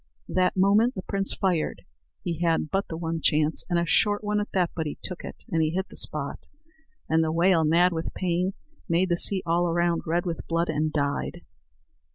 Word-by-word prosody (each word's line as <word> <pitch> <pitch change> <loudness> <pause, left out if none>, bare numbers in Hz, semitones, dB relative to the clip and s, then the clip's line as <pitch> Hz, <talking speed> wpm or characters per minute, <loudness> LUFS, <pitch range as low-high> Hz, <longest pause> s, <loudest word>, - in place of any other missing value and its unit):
That 185 0 +1
moment 205 +6 +4
the 185 - -5
prince 195 0 -2
fired. 180 -5 -1 0.4
He 170 -3 -3
had 165 -3 +1
but 195 +1 0
the 160 - -5
one 165 -1 -3
chance, 150 +1 +2
and 175 - +2
a 170 - +1
short 205 +6 +2
one 210 0 0
at 205 - -5
that; 180 -3 +1
but 160 -2 -2
he 150 - -5
took 180 - -6
it, - - -9
and 165 -2 +2
he 155 - +2
hit 190 +1 -2
the - - -12
spot, - - -2 0.7
and 160 0 +3
the 160 - 0
whale, 170 0 +3
mad 170 +3 +4
with 160 0 -3
pain, 180 +1 0 0.4
made 175 +3 +2
the 175 - +3
sea 190 +1 +3
all 170 +1 +2
around 170 0 +1
red 170 +3 0
with 170 -2 -4
blood, 170 0 0
and 155 0 0
died. 140 -1 -2
170 Hz, 205 wpm, -26 LUFS, 160-185 Hz, 0.7 s, moment